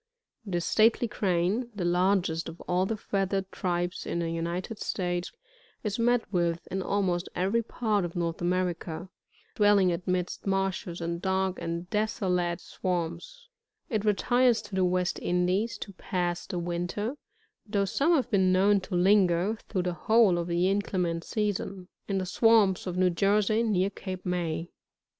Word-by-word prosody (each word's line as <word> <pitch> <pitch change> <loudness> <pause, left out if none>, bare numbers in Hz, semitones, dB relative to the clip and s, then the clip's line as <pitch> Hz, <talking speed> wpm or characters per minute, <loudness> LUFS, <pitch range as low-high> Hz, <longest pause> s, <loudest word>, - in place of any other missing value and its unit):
This 175 -3 -1
stately 225 +2 +3
Crane, 195 +4 0
the 185 -4 -2
largest 175 -2 +1
of 165 - -11
all 180 +1 0
the 225 - -2
feathered 195 -1 -1
tiribes 175 0 -2
|p - - -6
the 170 -1 -1
United 170 +6 -3
States, 175 -1 -2 0.5
is 210 0 -2
met 240 0 +3
with 170 -1 0
in 190 - -1
almost 185 -3 0
every 195 +6 +1
part 215 -3 -1
ef 175 0 -5
North 170 -1 -2
America, 175 -1 -2 0.4
dwelling 205 -3 +4
amidst 180 +2 -2
marshes, 195 -3 -1
and 170 0 -3
dark 190 0 0
and 170 +1 -3
deso 210 -3 0
late 175 -1 -1
swamps; 180 - -4 0.4
it 215 -3 0
retires 235 +2 +3
to 210 - -13
the 190 0 +2
West 180 0 0
Indies 185 +5 0
to 200 - -8
pass 175 -2 -2
the 180 - -4
winter, 175 +8 -2 0.5
though 200 -1 +1
some 285 - +2
have 260 -4 0
been 190 -3 +3
known 195 +2 +4
to 185 0 -5
linger, 185 +1 +3
through 185 -4 -1
the 180 0 -1
whole 205 +1 +4
of 170 - -3
the 175 +1 +1
inclement 185 -4 0
season, 195 -3 -2 0.2
in 195 - -1
the 190 - -1
swamps 205 -1 +3
of 180 0 -3
New 185 -1 +3
Jersey, 205 +4 +2
near 200 -4 +1
Cape 185 -2 -7
May. 175 -2 -2
185 Hz, 155 wpm, -28 LUFS, 175-205 Hz, 0.5 s, dwelling